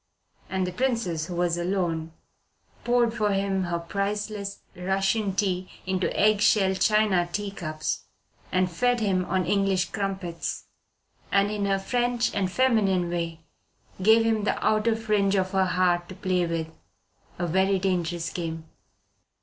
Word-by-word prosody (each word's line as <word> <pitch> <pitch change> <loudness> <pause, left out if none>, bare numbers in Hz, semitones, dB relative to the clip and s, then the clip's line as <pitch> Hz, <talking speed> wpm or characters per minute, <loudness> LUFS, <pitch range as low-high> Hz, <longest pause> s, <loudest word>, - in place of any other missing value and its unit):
And 190 -1 0
the 180 - -3
Princess, 210 -11 -1
who 180 - -5
was 175 0 0
alone, 175 -3 -1 0.7
poured 240 -1 +2
for 210 -2 +1
him 195 -1 0
her 175 -1 -1
priceless 200 +3 -3
Russian 195 +2 0
tea 185 -2 0 0.2
into 185 -1 0
egg 210 0 +4
shell 195 -3 +4
China 190 -2 +2
tea 205 +2 -3
cups 155 -5 -4 0.5
and 185 -1 +1
fed 245 +7 +1
him 190 -4 +1
on 185 0 0
English 190 -1 +1
crumpets, 190 -4 -3 0.7
and, 200 +1 +3
in 205 -1 -1
her 195 0 +2
French 240 +4 0
and 190 -2 0
feminine 195 -8 +2
way, 165 -1 -3 0.6
gave 220 +3 +5
him 220 -2 +1
the 210 - 0
outer 215 +1 +3
fringe 210 -3 +1
of 185 -1 0
her 190 -1 +2
heart 180 -1 +1
to 185 - -8
play 185 -2 0
with 165 -1 -2 0.7
a 175 - -1
very 190 +3 +2
dangerous 175 -3 -1
game. 165 -2 -5
190 Hz, 145 wpm, -26 LUFS, 175-210 Hz, 0.7 s, gave